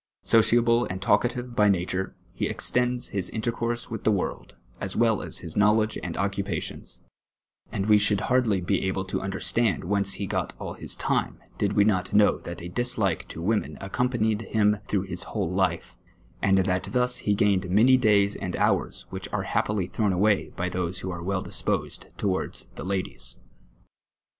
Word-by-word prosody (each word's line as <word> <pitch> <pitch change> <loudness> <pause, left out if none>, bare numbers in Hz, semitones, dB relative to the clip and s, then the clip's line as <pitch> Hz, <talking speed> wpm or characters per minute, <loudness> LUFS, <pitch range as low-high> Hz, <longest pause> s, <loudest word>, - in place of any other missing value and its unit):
Sociable 115 +1 +4
and 95 - -5
talkative 120 +5 0
by 105 -2 +4
nature, 95 0 -1 0.2
he - - -1
extends 125 0 0
his 95 -3 -2
intercourse 120 +1 -3
with 115 - -5
the 110 - +3
world, 100 -3 -3 0.2
as 95 - -4
wi'll 115 -3 +3
aa - - -5
his 85 -3 -4
knowledge 105 +1 +3
and 85 -2 -5
occuj)ations; 100 -3 -3 0.7
and 95 - -2
wc 105 0 +6
should 105 -1 +2
hardly 120 -7 +2
be 90 - 0
able 95 0 -1
to 95 - -2
imderstand 95 0 0
whence 100 +2 +1
he 100 - -3
got - - -2
all - - -6
his - - -4
time, - - -1 0.2
did - - +1
we 100 - +5
not 95 -4 +1
know 105 0 +5
that 85 0 -7
a - - -5
dislike 110 -4 0
to 80 - -7
women 105 +3 0
accompanied 110 +1 0
him 105 -1 +2
through 100 -3 0
his 95 -2 -4
whole 95 -5 -2
life; 90 -3 -1 0.4
and 95 0 +4
that 90 -1 +1
thus 125 0 +2
he 105 - 0
gained 100 -3 +2
many 115 +8 +6
days 105 -5 +3
and 90 - -4
hours - - 0
which - - -6
arc - - -2
happily 105 -4 0
throNm 105 +1 0
away 100 +3 +2
by 90 - -2
those 90 0 -3
who 95 - -4
are 85 -1 -5
well 95 +1 -1
di.sposed - - -2
towards 95 -2 -2
the - - -7
ladies. 95 -10 -2
100 Hz, 175 wpm, -26 LUFS, 95-110 Hz, 0.7 s, wc